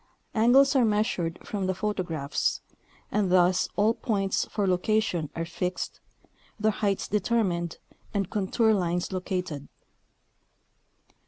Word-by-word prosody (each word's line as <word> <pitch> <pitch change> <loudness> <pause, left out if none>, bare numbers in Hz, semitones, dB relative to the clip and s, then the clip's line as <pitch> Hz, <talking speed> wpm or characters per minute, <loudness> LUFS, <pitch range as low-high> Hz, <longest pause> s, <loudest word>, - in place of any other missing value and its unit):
Angles 260 +6 +5
are 260 - +5
measured 210 -6 0
from 195 -3 -2
the 190 - 0
photographs, 175 -8 -1 0.5
and 200 -4 +1
thus 180 0 +4
all 215 +2 +3
points 195 -5 0
for 205 - -1
location 185 -3 +1
are 165 - -2
fixed, 180 +2 -4 0.6
their 215 +1 +3
heights 200 -2 -1
determined 190 -5 0 0.3
and 200 -3 -1
contour 220 +3 +2
lines 180 -2 0
located. 180 -6 -3
195 Hz, 110 wpm, -27 LUFS, 180-215 Hz, 0.6 s, Angles